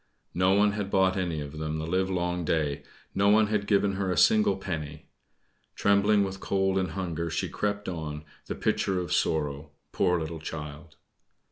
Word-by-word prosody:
No 90 +2 +3
one 105 +1 +4
had 100 -1 -3
bought 95 -1 +3
any 85 -5 -2
of 75 +2 -7
them 80 0 -2
the 80 - -3
livelong 90 0 -1
day 75 -3 0 0.3
no 100 +1 +3
one 110 +1 +5
had 105 -2 -1
given 100 -1 +3
her 95 -2 -1
a - - -1
single 215 -2 +4
penny. 80 -3 -6 0.6
Trembling 100 +1 +3
with 95 -1 -4
cold 95 0 +1
and 95 -4 -2
hunger 85 -3 -3
she 80 - -2
crept 105 0 -2
on, 75 -3 -5 0.2
the - - -3
picture 95 -2 0
of 90 0 -3
sorrow; 75 -4 -1 0.2
poor 90 -1 +2
little 80 0 -5
child! 75 0 -8
90 Hz, 170 wpm, -28 LUFS, 80-100 Hz, 0.6 s, one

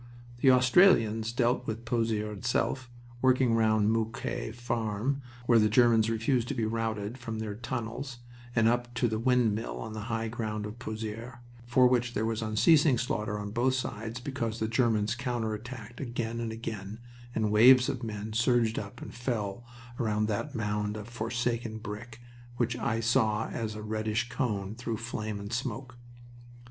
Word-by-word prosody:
The 135 - +5
Australians 125 - +5
dealt 120 +1 +1
with 115 +1 -4
Pozieres 110 -3 0
itself, 125 +5 -1 0.3
working 130 -2 +4
round 110 -1 +3
Moquet 115 0 -2
Farm, 120 +2 -1 0.2
where 120 -1 +5
the 105 0 +4
Germans 115 -1 +5
refused 115 +2 +1
to - - -3
be 115 - 0
routed 110 +1 -2
from 115 -2 -5
their 110 -1 -3
tunnels, 120 +2 -5 0.4
and 115 -1 +4
up 120 +1 +1
to 120 0 +2
the 110 -1 -1
Windmill 115 -2 +1
on 110 - -6
the 110 -1 -5
high 115 -1 -1
ground 110 -2 -3
of 105 +3 -8
Pozieres, 110 +2 -5 0.3
for 125 +1 +5
which 120 -1 +2
there 110 - +1
was 115 0 -1
unceasing 135 +6 +4
slaughter 110 -3 -2
on 105 0 -5
both 125 +4 +2
sides 115 -2 -4
because 120 -4 -3
the 110 - -1
Germans 110 -2 +2
counter 120 -3 -2
attacked 115 +2 -8
again 120 -2 -3
and 115 -1 -3
again, 110 -2 -6 0.4
and 110 -2 +1
waves 125 +4 +7
of 130 - -2
men 110 -2 -5
surged 115 -1 +2
up 100 -1 -8
and - - -8
fell 115 -3 -3 0.4
around 105 -2 +1
that 115 +7 -2
mound 105 -1 -1
of 105 0 -7
forsaken 115 -1 -2
brick, 115 +2 -8 0.4
which 120 -1 0
I 115 -2 -1
saw 110 -1 +2
as 110 -2 -3
a 105 - -6
reddish 110 +2 -1
cone 105 -8 -2
through 115 -1 -4
flame 110 -2 -4
and 100 +3 -6
smoke. 125 0 -4
115 Hz, 165 wpm, -29 LUFS, 110-120 Hz, 0.4 s, waves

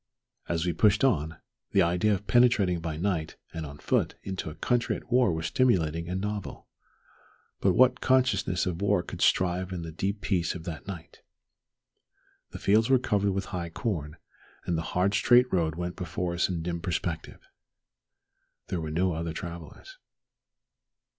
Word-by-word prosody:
As 85 0 0
we 90 - 0
pushed 105 +5 +3
on, 80 - +1 0.4
the 95 - +5
idea 90 +5 +2
of 100 +2 -7
penetrating 110 -8 +3
by 80 -2 -4
night 85 -3 -1 0.2
and 80 -2 -5
on 70 0 -10
foot - - 0
into 95 -4 -4
a 75 - -9
country 120 +8 0
at 125 - -11
war 125 -5 +4
was 80 -1 -3
stimulating 85 -10 +1
and 90 +1 -2
novel. 105 0 -5 0.9
But - - +3
what 130 0 +4
consciousness 110 -9 +2
of 90 0 -3
war 100 -3 +2
could 90 +1 -8
survive 90 0 +2
in 90 -2 -4
the 80 - -6
deep 100 +5 -3
peace 90 -4 0
of 85 - -7
that 85 -1 -7
night? 90 -4 -9 1.3
The - - -8
fields 110 +4 +3
were 135 - +6
covered 100 -5 0
with 95 0 -2
high 85 -2 -3
corn, 80 -5 -3 0.5
and 85 - 0
the 80 - -1 0.2
hard 95 +2 +2
straight 125 +3 +4
road 80 -4 +1
went 90 +1 -4
before 90 -1 -3
us 85 - +1
in 85 -3 -3
dim 85 0 -3
perspective. 85 -1 -4 1.2
There 90 - -2
were 80 - -4
no 90 +3 +1
other 80 0 -3
travellers. 85 - -9
90 Hz, 165 wpm, -28 LUFS, 85-100 Hz, 1.3 s, were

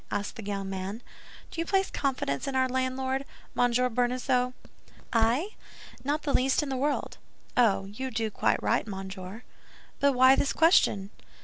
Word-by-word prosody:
asked 205 +3 -3
the 225 - -7
young 200 -1 -3
man. 195 +4 -5 0.5
"Do 330 - -3
you - - -2
place 390 -1 +1
confidence 255 - -1
in 275 - -2
our 260 0 +3
landlord—Monsieur 255 -1 -1
Bonacieux?" 250 +1 +1 0.6
"I? 235 - +2 0.5
Not 295 +3 -1
the 285 - -1
least 265 +3 +3
in 290 - -4
the 265 - -1
world." 285 +3 -1 0.4
"Oh, 220 -5 +3
you 220 +7 -5
do 225 -2 -2
quite - - +1
right, - - +1
monsieur." 190 +2 -7 0.6
"But 280 -1 +4
why 260 +1 +7
this 275 - +1
question?" 210 - +4
250 Hz, 150 wpm, -28 LUFS, 205-270 Hz, 0.6 s, why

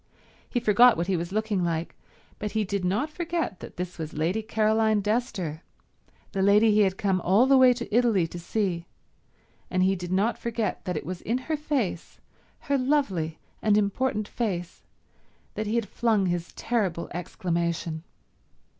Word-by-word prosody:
He 245 - 0
forgot 235 +1 +6
what 170 - 0
he 190 +1 0
was 170 +1 -3
looking 210 -3 0
like, 170 -1 -2 0.4
but 210 -1 -4
he 220 -1 +1
did 200 -1 -2
not 210 +12 0
forget 335 - -3
that - - -10
this 180 -1 -5
was 160 -1 -5
Lady 170 +8 0
Caroline 220 0 +2
Dester, 205 - -2 0.7
the 195 - -1
lady 210 +3 +5
he 210 - +3
had 190 -2 +3
come 190 -3 +1
all 195 +9 +4
the 270 +1 +5
way 260 -1 +7
to 240 -3 -5
Italy 230 -8 +3
to 170 +1 -7
see, 175 -2 -2 0.8
and 185 0 +1
he 190 +1 +3
did 175 -1 -6
not 200 +5 +1
forget 230 -3 -2
that 180 -4 -2
it 150 - -5
was 180 +2 -5
in 235 +3 0
her 310 +5 -2
face, 275 - -2 0.4
her 280 -1 0
lovely 205 - 0 0.2
and 210 -1 +3
important 210 +1 0
face, 185 -8 -4 0.7
that 215 0 -3
he 215 - -1
had 230 -3 0
flung 220 -2 +1
his 175 -1 -2
terrible 195 -8 -1
exclamation. 170 -2 -2
205 Hz, 170 wpm, -26 LUFS, 175-230 Hz, 0.8 s, way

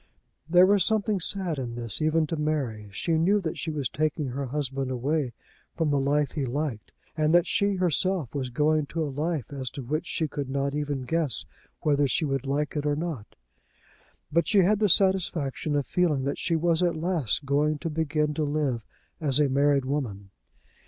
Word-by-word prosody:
There 180 +2 +7
was 200 -1 +4
something 215 -1 +1
sad 175 -3 +1
in 120 -2 -4
this, 120 +2 +2
even 155 +1 +2
to 165 - -3
Mary. 140 -9 -2
She 160 - 0
knew 195 +6 +3
that 160 -4 -4
she 160 - -3
was 145 -5 -1
taking 150 -1 -1
her 135 +2 -4
husband 135 -1 -2
away 130 +1 -1 0.4
from 160 -3 0
the 140 - +2
life 145 0 +1
he 150 - -2
liked, 130 -3 -3 0.2
and 155 +1 +2
that 175 0 +5
she, 200 0 +1
herself, 180 -4 0
was 135 -3 -3
going 150 +3 +1
to 165 +2 -2
a 145 -3 -4
life 150 -3 -2
as 130 -2 -3
to 135 - -7
which 150 +6 -2
she 160 - -1
could 140 -2 -5
not 140 +1 -1
even 145 -2 -2
guess, 155 0 -1 0.4
whether 145 -1 +2
she 155 +5 0
would 135 -1 -2
like 145 +2 -1
it 150 0 -1
or 145 - +1
not. 155 -8 -5 1.0
But 170 +1 +2
she 205 -2 +5
had 205 +3 +3
the 210 -2 +3
satisfaction 165 -7 +2
of 145 -2 0
feeling 155 -3 +1
that 140 - -2
she 165 - 0
was 165 +1 +2
at 175 -2 +2
last 155 - 0
going 145 +2 +1
to 165 +3 -4
begin 150 -1 0
to 155 - -1
live 145 -6 -1 0.4
as 145 -4 +1
a 145 -2 +3
married 140 0 +2
woman. 110 -9 -3
150 Hz, 195 wpm, -26 LUFS, 135-165 Hz, 1.0 s, There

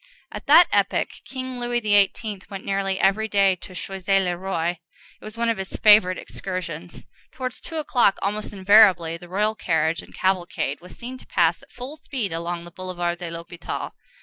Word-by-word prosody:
At - - -8
that 345 - +8
epoch, 200 -1 +1 0.2
King 255 0 -6
Louis 240 0 -1
XVIII. 205 -1 +2
went 195 -2 -7
nearly 195 -1 -1
every 215 +3 +2
day 195 -2 +3
to 185 - -12
Choisy 195 +1 0
le 180 -2 0
Roi: 175 -2 -2 0.5
it - - -17
was 215 +1 -9
one 235 0 0
of 230 -3 0
his 190 - -5
favorite 205 -4 +6
excursions. 175 -3 -6 0.3
Towards 255 -1 -5
two 325 - -7
o'clock, 245 -9 +2
almost 210 +2 -2
invariably, 190 -4 +5
the 175 +1 -13
royal 210 +4 +1
carriage 165 -5 0
and - - -16
cavalcade 175 -6 -1
was 180 - -13
seen 255 +2 -7
to - - -17
pass 170 -1 +2
at - - -20
full 255 +5 -8
speed 240 - -4
along 170 +1 -3
the 175 - -12
Boulevard 175 -1 -3
de 175 -2 -5
l'Hôpital. 170 +1 -6
195 Hz, 180 wpm, -23 LUFS, 175-215 Hz, 0.5 s, that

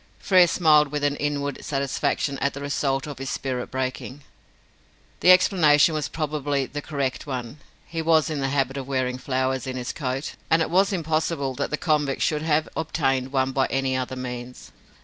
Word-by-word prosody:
Frere 185 -2 +5
smiled 155 -3 +4
with 145 0 -4
an 145 0 +1
inward 145 -1 -2
satisfaction 140 0 -1
at 140 0 -1
the - - -5
result 140 0 -1
of 145 -3 -8
his 135 -1 -4
spirit 130 -2 -3
breaking. 130 +1 -4 1.0
The - - +3
explanation 175 -5 +5
was 150 -2 -1
probably 145 -3 -1
the 145 +2 -6
correct 140 -2 -3
one. 130 +1 -5 0.3
He 165 -1 -4
was 160 -1 +3
in 155 -3 -3
the 135 - 0
habit 135 -1 0
of 135 -1 -5
wearing 130 -2 -1
flowers 130 -1 -1
in 130 0 -4
his 125 0 -4
coat 135 -1 -3 0.2
and 165 - +4
it - - -5
was 195 +3 +3
impossible 160 -5 -1
that - - -3
the 150 - -1
convict 150 -4 0
should 150 -3 0
have 155 0 +1
obtained 135 -5 -1
one 135 -1 +1
by 135 0 +1
any 135 -1 0
other 130 0 -3
means. 125 -1 -7
140 Hz, 185 wpm, -24 LUFS, 130-155 Hz, 1.0 s, Frere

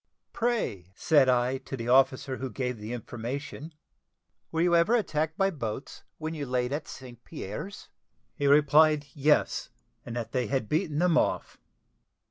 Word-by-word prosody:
"Pray," 225 - -1
said 145 -1 +4
I, 125 +1 +2
to 135 - -7
the 115 -1 -5
officer 130 +1 +3
who 130 - -4
gave 125 +1 -3
the 105 +2 -7
information, 125 +6 -6 0.8
"were 165 - 0
you 175 -1 +4
ever 170 +8 +4
attacked 160 -7 -1
by 195 0 +2
boats 130 - -6 0.2
when 160 0 -4
you 145 -3 -4
laid 125 +1 -1
at 150 - -3
St. 120 -2 -11
Pierre's?" 110 - -7 0.5
He 145 - -1
replied, 150 +1 +5
"Yes; 150 +1 +2 0.3
and 120 - -7
that 120 -2 -4
they 125 -3 0
had 130 -4 -1
beaten 155 - -1
them 170 -1 +4
off." - - -2
140 Hz, 155 wpm, -28 LUFS, 125-155 Hz, 0.8 s, replied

